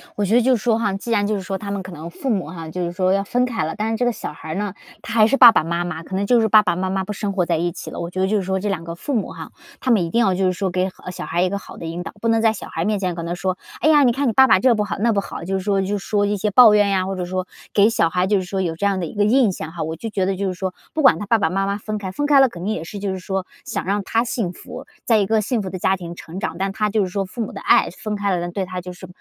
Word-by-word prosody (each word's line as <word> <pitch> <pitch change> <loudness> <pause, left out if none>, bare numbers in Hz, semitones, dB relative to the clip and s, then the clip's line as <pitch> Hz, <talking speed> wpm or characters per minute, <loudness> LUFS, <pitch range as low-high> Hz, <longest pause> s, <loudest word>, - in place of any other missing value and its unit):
我 205 - 0
觉 215 +4 +2
得 245 - +6
就 255 +2 +3
是 215 - -5
说 230 -2 +3
哈 210 -4 0
既 205 +4 -5
然 205 -2 +2
就 215 - 0
是 195 - -3
说 195 +1 -4
他 200 0 -6
们 200 -2 -3
可 185 - -9
能 165 0 -8
父 265 - -5
母 195 -9 0
哈， 165 -1 -8
就 180 +2 -3
是 170 - -3
说 185 +1 +1
要 195 0 +1
分 245 +5 +1
开 230 -6 -2
了， 160 - -4
但 215 +1 -1
是 225 - -1
这 250 - 0
个 245 - +2
小 - - -6
孩 160 0 -11
儿 155 - -3
呢， 205 -1 -2 0.3
他 - - -7
还 220 -2 +5
是 275 - +2
爸 240 -3 +10
爸 220 - +2
妈 170 +2 -1
妈 165 -2 -5
可 185 - -6
能 200 +1 0
就 240 +3 +4
是 220 - +2
爸 215 0 +7
爸 170 - 0
妈 185 +1 -2
妈 190 0 -1
不 210 +2 -5
生 200 -1 -3
活 180 -3 +1
在 170 -1 0
一 175 +2 -1
起 - - -8
了。 - - -6
我 170 - -4
觉 185 - -5
得 190 - +2
就 210 +2 +1
是 195 - -1
说， 190 +1 -1
这 205 - -2
两 180 -4 -2
个 170 0 -6
父 280 - -4
母 215 - -1
哈， - - -9 0.3
他 255 - 0
们 210 -6 +4
一 165 - -5
定 235 - +1
要 195 -4 +3
就 190 0 +1
是 185 - +2
说 190 +1 -2
给 185 +1 0
好 185 - -11
小 - - -6
孩 175 - -1
一 185 - +2
个 200 - -2
好 200 - -11
的 165 - -7
引 170 +2 -4
导， - - -8
不 230 - -1
能 225 0 +3
在 220 -1 +3
小 215 - -8
孩 165 +2 -3
面 210 -1 0
前 180 -3 -2
跟 170 -1 -5
他 175 +1 -3
说， 185 +1 -2 0.2
“哎 310 - +4
呀， 295 -2 +6
你 245 - +5
看 275 +3 -1
你 225 - +1
爸 265 +2 +6
爸 - - +5
这 255 -2 +4
不 210 - 0
好 205 - -4
那 230 +2 +2
不 205 - +1
好”， - - -8
就 190 +3 -2
是 190 - -3
说 195 0 +1
就 200 +2 -1
说 205 +1 0
一 205 0 0
些 210 +2 -1
抱 225 0 +8
怨 205 -1 +4
呀， 190 -2 +1
或 195 0 -3
者 180 -1 -3
说 185 +1 -3 0.3
给 205 +1 +5
小 170 -8 +2
孩 180 +1 0
就 205 0 +3
是 185 - -1
说 190 +1 -3
有 165 -3 -2
这 200 +5 -2
样 195 -2 +1
的 175 - -2
一 - - -9
个 205 - +2
印 235 -1 +4
象 160 -3 -6
哈。 170 -2 -4
我 160 +1 -4
就 225 +7 -6
觉 195 -3 -1
得 190 0 0
就 195 +1 -2
是 185 - -2
说 185 0 -4 0.2
不 315 - 0
管 215 - +6
他 205 - -4
爸 225 +3 +3
爸 195 -6 +1
妈 195 +2 0
妈 200 +1 -1
分 215 +1 -4
开 190 -2 -5
分 290 - -2
开 290 -1 +5
了， 270 -2 +6
肯 170 -4 -9
定 215 - 0
也 160 - -4
是 200 +5 -7
就 200 -1 -2
是 190 - -4
说 190 0 -3 0.2
想 - - -3
让 200 +1 0
他 230 +4 +1
幸 225 -6 -2
福 - - -10 0.2
在 225 - +4
一 205 - +2
个 220 +2 +2
幸 225 +1 -1
福 190 - -5
的 185 - -6
家 190 +2 +2
庭 175 -2 -8
成 170 +2 -8
长， 160 - -3
但 195 +1 -1
他 210 +1 -1
就 210 0 +1
是 185 - -3
说 195 +1 -2
父 210 +6 -7
母 215 - -3
的 - - -8
爱 - - +4
分 210 +3 -5
开 200 -2 0
了， 175 0 -3
对 190 +1 -2
他 185 0 -5
就 180 0 -8
是 185 +1 -11
195 Hz, 400 characters per minute, -21 LUFS, 180-215 Hz, 0.3 s, 爸